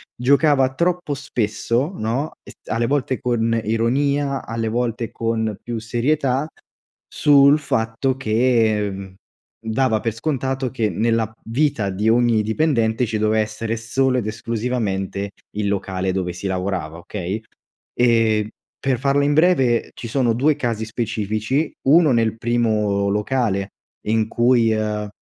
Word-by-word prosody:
giocava 135 +1 +3
troppo 175 -1 0
spesso, 125 - -1
no, 125 +6 -2
es - - -12 0.2
alle 115 +1 +1
volte 135 -2 0
con 115 -2 0
ironia, 140 +5 0
alle 115 0 -2
volte 115 -1 -2
con 110 -2 -2
più 120 -1 -4
serietà 130 +4 0 0.6
sul 145 0 +5
fatto 120 -1 -1
che, 110 -3 +2
mhmm, 95 -1 -8 0.5
dava 110 0 +1
per 115 0 -2
scontato 130 0 -2
che, 115 -5 0
nella 115 +1 0 0.2
vita 125 -4 0
di 105 +4 -1
ogni 115 -2 +3
dipendente 115 -1 +1
ci 110 0 -2
doveva 110 +1 +2
essere 110 +1 -3
solo 130 +4 0
ed 115 - -4
esclusivamente 110 -3 -2 0.3
il 105 -1 0
locale 95 -1 -1
dove 90 -2 -2
si 90 +3 -5
lavorava, 90 -4 -3
okay. 95 +3 -4 0.6
E 115 -3 +3 0.3
per 130 -3 +1
farla 140 +2 +2
in 145 - +2
breve, 145 -8 +3
ci 115 - -7
sono 120 -1 +1
2 140 +5 +2
casi 115 -3 -2
specifici: 110 +5 -2 0.2
1 155 -1 +6
nel 115 -1 +1
primo 110 -4 +1
locale, 105 -1 0 0.4
in 110 0 +1
cui, 120 0 +3
ehm, 105 -1 -2
115 Hz, 135 wpm, -21 LUFS, 110-130 Hz, 0.6 s, 1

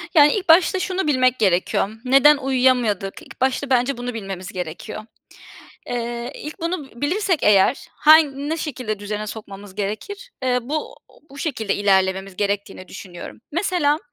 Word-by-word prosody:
Yani, 295 -1 +7
ilk 390 -4 -3
başta 350 +3 +5
şunu 370 -3 -2
bilmek 255 -3 +2
gerekiyor: 190 0 +1 0.2
Neden 275 +3 +6
uyuyamadık? 250 -7 +1
İlk - - -15
başta 265 +1 0
bence 255 +1 +2
bunu 245 0 -4
bilmemiz 195 -4 -6
gerekiyor. 180 +5 -6 0.9
Eee, 240 0 -4
ilk 305 +4 -8
bunu 335 -4 -3
b 235 - -16
bilirsek 360 +3 +1
eğer 210 +5 +3
han 295 -2 +5
ne 320 - -1
şekilde 255 -9 -4
düzene 210 +1 -4
sokmamız 205 -2 -9
gerekir? 305 - -5
Eee, 250 -1 +2
bu 300 +6 -4 0.4
bu 280 - -12
şekilde 235 -9 -2
ilerlememiz 190 -1 +1
gerektiğini 200 -2 -3
düşünüyorum. 180 0 -10
Mesela 335 -4 +1
250 Hz, 145 wpm, -21 LUFS, 205-295 Hz, 0.9 s, Yani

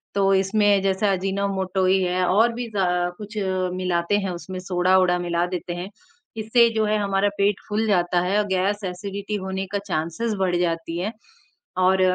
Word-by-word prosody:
तो 195 -1 +3
इसमें 200 +1 +3
जैसे 195 +1 +1
अजीनोमोटो 195 0 0
ही 190 +1 +3
है 180 0 +1
और 225 +6 +3
भी 240 +1 -4
ज 195 - +1 0.4
कुछ 210 +1 -9 0.4
मिलाते 180 +1 0
हैं 195 -2 -3
उसमें 185 +1 -6
सोडा-ओडा 185 0 +2
मिला 175 0 0
देते 180 -1 -4
हैं। 180 +2 -6 0.5
इससे 230 +2 +4
जो 220 -1 +2
है 215 0 +1
हमारा 200 0 +1
पेट 200 0 +2
फूल 215 +1 0
जाता 180 -3 +2
है 185 +3 0
और 210 - +1
गैस 195 +2 0
एसिडिटी 200 +3 -5
होने 190 0 -3
का 205 - 0
चांसेस 170 +7 -2
बढ़ 185 -2 +1
जाती 165 -1 -2
है। 205 +5 -3 0.6
और, 185 +1 +3
190 Hz, 175 wpm, -23 LUFS, 180-205 Hz, 0.6 s, इससे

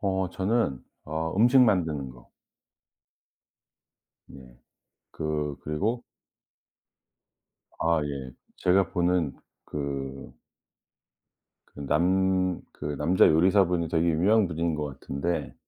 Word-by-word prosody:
어 95 -2 0
저는 95 - -1 0.2
어 80 +2 -3
음식 125 +5 +5
만드는 80 - +2
거. - - -17 2.0
네. 65 -3 -15 0.5
그 75 -2 -3
그리고 105 +11 -2 1.8
아 80 -1 +2
예. 70 -3 -5 0.3
제가 95 +1 +2
보는 85 -4 +1 0.3
그 70 -3 -5 1.4
그 - - -10
남 95 +2 +2
그 75 -1 -5
남자 85 +5 +4
요리사분이 90 0 +3
되게 85 +1 +1
유명한 100 +6 +3
분인 85 -1 -1
것 75 -3 -5
같은데 85 +6 -3
85 Hz, 165 characters per minute, -27 LUFS, 75-95 Hz, 2.0 s, 음식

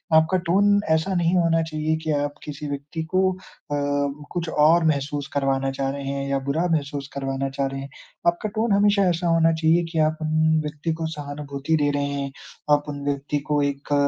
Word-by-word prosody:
आपका 160 +4 +4
टोन 205 +2 +4
ऐसा 160 +5 +2
नहीं 175 +1 +2
होना 165 -1 +3
चाहिए 155 0 -1
कि 160 - -1
आप 145 0 -1
किसी 150 0 -6
व्यक्ति 145 +3 -4
को 185 0 +4
अ, - - -11 0.9
कुछ 170 -2 -3
और 160 +3 +4
महसूस 145 -1 0
करवाना 135 -1 +1
चाह 135 0 -2
रहे 140 0 -5
हैं 140 0 -3
या 140 - +1
बुरा 160 +5 +1
महसूस 140 -2 -1
करवाना 135 0 -2
चाह 135 0 -1
रहे 135 0 -5
हैं। 140 - -8 0.4
आपका 175 +5 +1
टोन 220 0 +1
हमेशा 200 0 +4
ऐसा 175 +1 0
होना 165 -1 +4
चाहिए 160 +2 +3
कि 160 - -1
आप 155 - -6
उन 155 0 +2
व्यक्ति 150 +2 -3
को 160 0 -3
सहानुभूति 145 +1 -3
दे 145 - +3
रहे 145 0 0
हैं, 140 -1 -3 0.4
आप 145 0 +4
उन 145 -1 -5
व्यक्ति 145 +1 -1
को 145 -1 +3
एक 140 +1 -2
150 Hz, 195 wpm, -24 LUFS, 140-165 Hz, 0.9 s, आपका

